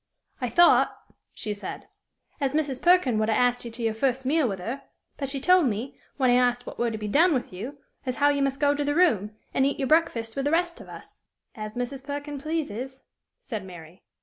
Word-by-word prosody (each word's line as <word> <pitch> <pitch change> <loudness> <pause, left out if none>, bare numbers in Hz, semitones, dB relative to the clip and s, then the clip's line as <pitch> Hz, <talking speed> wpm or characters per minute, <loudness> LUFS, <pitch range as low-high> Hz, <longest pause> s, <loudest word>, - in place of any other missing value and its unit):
"I 250 - -1
thought," 345 +7 +5 0.3
she 210 - -4
said, 205 - -7 0.5
"as 275 -2 0
Mrs. 285 -4 -1
Perkin 345 -11 +4
would 215 0 +1
'a' 220 - +2
as't 245 0 +2
you 235 - -6
to 230 +1 -6
your 225 -1 +1
first 255 +3 0
meal 290 -1 +2
with 195 - -3
her; 235 +10 -5 0.4
but 275 -2 -3
she 275 0 -2
told 360 +1 +5
me, 230 +4 -4 0.2
when 255 -2 +3
I 245 - +5
as't 245 0 -7
what - - -9
were 240 - +2
to 220 - -4
be 210 -1 -4
done 315 - +4
with 245 -6 -3
you, 240 +11 -6 0.3
as 255 -2 -2
how 290 0 +4
you 285 -1 +1
must 275 0 0
go 285 -1 +4
to 290 0 -1
the 290 0 0
room, 265 - +3 0.2
and 265 - +2
eat 280 +1 +1
your 270 - -1
breakfast 240 -8 +1
with 275 - -2
the - - +2
rest 340 +2 0
of - - -13
us." - - -11 0.3
"As 215 -1 -7
Mrs. 245 +2 -4
Perkin 285 0 -5
pleases," 265 -5 -4 0.4
said 220 - -5
Mary. 175 -2 -12
265 Hz, 230 wpm, -26 LUFS, 225-290 Hz, 0.5 s, thought